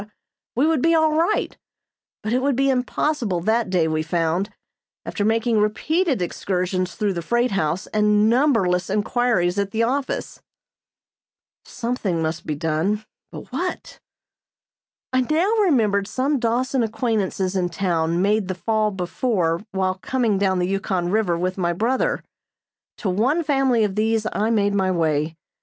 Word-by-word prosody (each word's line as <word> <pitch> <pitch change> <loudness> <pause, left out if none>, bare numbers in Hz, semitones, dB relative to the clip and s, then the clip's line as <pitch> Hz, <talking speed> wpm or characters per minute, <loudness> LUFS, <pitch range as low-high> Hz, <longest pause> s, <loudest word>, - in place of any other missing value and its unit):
we 260 +5 +3
would 320 -4 +2
be 330 +3 +4
all 315 -1 +3
right, 335 +6 0 0.7
but 215 +2 -1
it 255 - +2
would 275 0 +1
be 275 +2 +2
impossible 250 - 0
that 220 +5 +1
day 175 -3 +2
we 155 0 0
found, 165 +3 0 0.6
after 205 - -3
making 225 +1 +2
repeated 270 - +1
excursions 185 0 -2
through 210 -3 0
the 170 - -3
freight 240 +7 +1
house 175 -2 -1
and 210 0 +3
numberless 225 -8 +2
inquiries 205 -3 +1
at 200 -1 0
the 225 +3 0
office. 270 +3 -2 1.2
Something 230 -8 -2
must 160 +1 -3
be 150 - -1
done, 165 +8 -1 0.3
but - - -10
what? - - -4 1.1
I 255 - +3
now 320 - +1
remembered 215 - +2
some 270 +4 0
Dawson 250 +2 0
acquaintances 215 -4 -1
in 180 -2 0
town 170 -1 0
made 210 0 +1
the 185 - -3
fall 215 +2 0
before 180 -2 -1
while 190 -1 -1
coming 235 -6 0
down 190 -2 +2
the 180 0 0
Yukon 190 -2 -1
River 200 -5 +1
with 185 +2 -2
my 175 -1 +1
brother. 235 +9 0 0.7
To 205 - -2
one 260 - +1
family 270 -6 +2
of 205 -2 0
these 220 0 +1
I 215 +2 0
made 205 -3 +2
my 190 -2 +1
way. 160 -3 0
210 Hz, 150 wpm, -22 LUFS, 180-245 Hz, 1.2 s, be